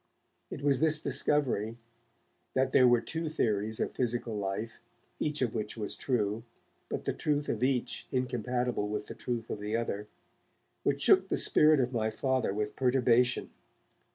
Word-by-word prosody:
It 140 - -7
was 140 -3 +3
this 155 0 +4
discovery, 120 -9 +1 0.8
that 130 0 +2
there 130 - +6
were 120 -1 +4
two 160 0 -4
theories 110 -7 -1
of - - -1
physical 120 -2 -2
life, 105 +3 -4 0.4
each 150 -2 0
of 120 - -1
which 110 0 -4
was 105 -2 -4
true, 110 -4 -1 0.5
but - - -3
the - - -1
truth 145 -1 -1
of 110 - -2
each 130 -1 -1
incompatible 125 -3 -1
with 105 0 -3
the - - -8
truth 115 0 -4
of - - -4
the 105 +2 -2
other, 105 -3 -3 0.7
which - - 0
shook - - +5
the - - +1
spirit 155 -1 +5
of 125 0 0
my 110 -2 0
Father 130 +1 0
with 105 +1 -3
perturbation. 125 -1 +2
120 Hz, 160 wpm, -30 LUFS, 110-130 Hz, 0.8 s, there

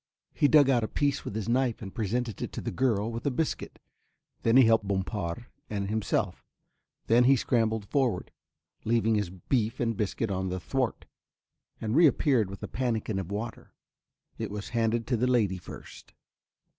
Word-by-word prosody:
He 145 - +3
dug 145 -2 +6
out 125 -4 +3
a - - 0
piece 140 +2 0
with - - -6
his 110 -3 -3
knife 125 0 +1
and 95 -3 -8
presented 115 0 -2
it - - -3
to - - -4
the - - -3
girl 115 -4 +1
with 115 0 -5
a - - +4
biscuit, 150 +4 -3 0.6
then 115 +2 +4
he 130 - +9
helped 110 -2 +3
Bompard 95 +1 -2 0.2
and 100 -1 -3
himself, 110 -1 -1 0.6
then 120 +2 +4
he 135 +2 +6
scrambled 110 -4 0
forward, 120 -5 0 0.5
leaving 115 0 +2
his 105 -4 0
beef 110 +5 -1
and 115 -2 0
biscuit 105 +1 -2
on 95 0 -1
the 90 0 -3
thwart, 75 -6 -2 0.7
and 110 +2 -2
reappeared 140 - +4
with 100 - -9
a - - -3
pannikin 115 -5 -1
of 95 0 -6
water; 110 +3 -6 0.6
it 110 -2 -3
was 105 0 -6
handed 115 0 0
to 125 0 0
the 125 +3 +1
lady 105 -7 +2
first. - - -12
115 Hz, 175 wpm, -28 LUFS, 100-125 Hz, 0.7 s, he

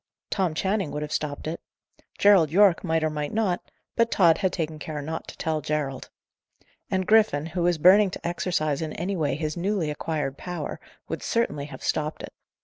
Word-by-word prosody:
Tom 185 -5 0
Channing 195 0 0
would 150 +1 -4
have 150 - -6
stopped 150 -2 -3
it. 160 +2 -4 0.6
Gerald 195 -6 +6
Yorke 190 +1 +4
might 160 -3 +1
or 155 - +1
might 150 -1 -3
not; 210 -5 0 0.3
but 230 0 +3
Tod 170 -7 +4
had 190 -2 +1
taken 160 -3 -3
care 150 0 -5
not 160 +3 -5
to - - -10
tell 160 -1 -1
Gerald. 140 -3 -3 0.8
And 190 0 0
Griffin, 210 -8 +4
who 170 +2 -3
was 175 -1 +2
burning 190 +5 +6
to 175 - -6
exercise 165 -4 -1
in 155 -1 -3
any 185 +4 -2
way 145 -6 0
his 155 0 -3
newly 175 -3 -1
acquired 150 -2 -3
power, 180 -1 -5 0.3
would - - -4
certainly 150 -12 -1
have 145 - -10
stopped 155 0 -1
it. - - -8
160 Hz, 190 wpm, -26 LUFS, 150-190 Hz, 0.8 s, Gerald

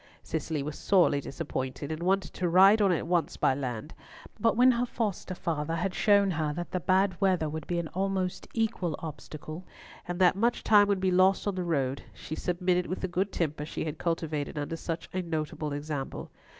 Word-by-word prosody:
Cicely 155 -2 -3
was 150 +1 -6
sorely 175 -7 +3
disappointed, 140 -1 -4
and 160 +1 -4
wanted 190 +2 +1
to 180 -1 -1
ride 195 +5 +7
on 195 -2 +4
at 170 - 0
once 170 -2 0
by - - +3
land; 130 +1 -4 0.5
but 225 +1 +2
when 255 +1 +7
her 245 0 +1
foster 205 -6 -3
father 165 -2 -2
had 180 +3 -1
shown 200 -1 +4
her 155 -3 -1
that 175 +2 -5
the 185 - -1
bad 185 +3 +1
weather 185 -5 +2
would 155 0 -5
be 175 - -1
an 170 -1 -2
almost 190 -1 -2
equal 215 -8 0
obstacle, 155 +1 -8 0.4
and 175 0 -3
that 180 -1 +5
much 235 +4 +1
time 205 -2 +6
would 200 -2 +1
be 190 -1 +2
lost 185 +1 +4
on 205 - 0
the 185 -1 -2
road, 140 -6 -1
she - - -8
submitted 180 +1 0
with 185 - -4
the 185 - -1
good 190 +2 -1
temper 155 -3 -2
she 150 - -4
had 155 -1 -5
cultivated 160 -3 -2
under 150 +3 -3
such 165 0 -5
a 185 - -1
notable 155 -3 -3
example. 145 -1 -5
175 Hz, 200 wpm, -29 LUFS, 155-190 Hz, 0.5 s, ride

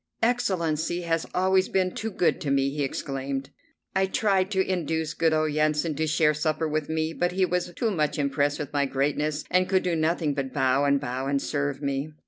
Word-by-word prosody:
"Excellency 175 -8 0
has 165 -1 -1
always 190 +1 +3
been 185 -1 +1
too 225 - -3
good 180 -4 +1
to 145 - -2
me!" 140 0 +2
he 145 0 -2
exclaimed. 135 0 -4 0.4
I 190 0 +3
tried 190 -2 +1
to 190 -2 +1
induce 160 -3 -1
good 165 -1 +2
old 155 -1 +1
Yansan 155 +1 +1
to 160 0 0
share 155 0 +3
supper 155 +1 -1
with 155 0 -2
me; 160 0 -1
but 175 +1 0
he 190 0 +2
was 180 0 -1
too 230 -3 0
much 150 -6 0
impressed 145 0 +1
with 150 -2 -6
my 140 -1 +1
greatness 145 +3 -1
and 185 0 +3
could 190 -1 +2
do 175 -2 0
nothing 160 -1 +1
but 135 -2 -3
bow 135 0 +2
and 140 0 +3
bow 130 +2 -3
and 140 0 +1
serve 145 0 -2
me. 140 +2 -2
155 Hz, 205 wpm, -26 LUFS, 140-180 Hz, 0.4 s, always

